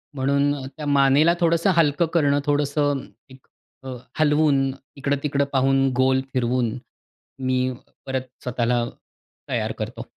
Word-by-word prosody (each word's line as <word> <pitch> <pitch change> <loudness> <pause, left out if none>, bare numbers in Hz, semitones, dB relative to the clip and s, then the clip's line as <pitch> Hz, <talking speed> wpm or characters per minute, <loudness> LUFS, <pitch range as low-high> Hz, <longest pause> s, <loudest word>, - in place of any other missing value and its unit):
म्हणून 140 +1 +1
त्या 150 +2 -9
मानेला 140 +3 +4
थोडंसं 170 +2 +2
हलकं 165 0 +3
करणं 145 -4 +3
थोडंसं 145 -1 0 0.8
अ, - - -5 0.3
हलवून, 150 -2 +3 0.4
इकडं-तिकडं 140 0 0
पाहून, 135 0 +3
गोल 130 +1 +3
फिरवून, 125 -1 0 0.6
मी 130 -1 0 0.5
परत 130 -1 -2 0.2
स्वतःला 120 -1 0 0.7
तयार - - -1
करतो. - - -5
140 Hz, 105 wpm, -23 LUFS, 130-145 Hz, 0.8 s, मानेला